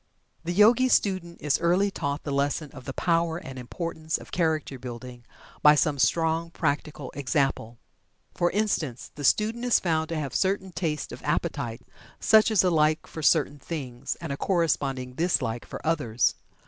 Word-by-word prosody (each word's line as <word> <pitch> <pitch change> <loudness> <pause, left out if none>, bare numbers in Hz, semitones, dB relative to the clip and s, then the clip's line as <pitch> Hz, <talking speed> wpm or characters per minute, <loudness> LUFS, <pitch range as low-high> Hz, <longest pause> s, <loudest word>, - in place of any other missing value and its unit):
The 170 - -2
Yogi 230 +7 +5
student 185 -7 +1
is 150 -2 +2
early 180 +4 +2
taught 140 -4 -3
the 145 - -4
lesson 140 +2 -1
of 130 -4 -12
the 135 - -5
power 165 0 +1
and 135 -6 -8
importance 160 +4 -4
of - - -13
character 155 -6 -1
building 120 -1 -9 0.4
by 150 0 +7
some 150 -2 +1
strong 165 +2 +1
practical 150 -3 -3
example. 135 -4 -1 0.6
For 175 - +1
instance, 170 - -2
the 145 - -8
student 220 - +2
is 245 -1 +4
found 160 -2 0
to 165 - -2
have 140 -4 -4
certain 190 0 0
tastes 160 -4 -3
of - - -9
appetite, 115 +1 -2 0.4
such 220 0 +5
as 215 -4 +4
a 180 - +3
like 155 -1 +2
for 160 - -8
certain 145 -2 +3
things, 135 -5 -5
and 165 -4 -5
a 140 - -3
corresponding 140 -8 0
dislike 130 -7 0
for - - -7
others. 125 -8 +1
155 Hz, 165 wpm, -26 LUFS, 135-175 Hz, 0.6 s, by